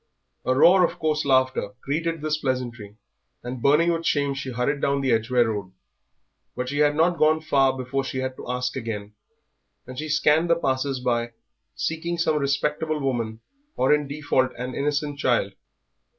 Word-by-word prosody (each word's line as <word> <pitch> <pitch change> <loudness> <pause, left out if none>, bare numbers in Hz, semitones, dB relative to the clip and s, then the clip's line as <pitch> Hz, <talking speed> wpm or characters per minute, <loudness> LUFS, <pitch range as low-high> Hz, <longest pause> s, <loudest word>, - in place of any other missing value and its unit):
A 130 - +2
roar 180 +7 +6
of - - 0
coarse 155 -1 0
laughter 130 -6 +1
greeted 165 +3 -2
this 155 0 0
pleasantry, 120 -6 -3 0.5
and 125 0 -6
burning 150 +6 +4
with 165 0 -2
shame 140 -3 +1
she 135 -1 -5
hurried 125 +4 -1
down 140 0 +1
the 135 -2 +1
Edgware 120 +1 +2
Road. 100 -4 -4 0.8
But 125 0 -3
she 145 +2 -2
had 145 0 +3
not 170 +2 +2
gone 155 +1 +4
far 135 -4 +2
before 130 +2 -2
she 130 - -5
had 130 0 -3
to - - -9
ask 125 0 -2
again, 105 -4 -5 0.7
and 130 0 -8
she 155 0 -4
scanned 150 +3 +3
the 170 - +5
passers 135 -3 -1
by 120 -1 -1 0.4
seeking 170 +2 -2
some 160 -2 +1
respectable 150 +2 -1
woman, 115 -5 -2 0.4
or 130 +3 +4
in 150 -1 +1
default 140 -3 0
an 125 +1 -5
innocent 145 +1 -2
child. 120 -7 +1
135 Hz, 170 wpm, -24 LUFS, 125-150 Hz, 0.8 s, roar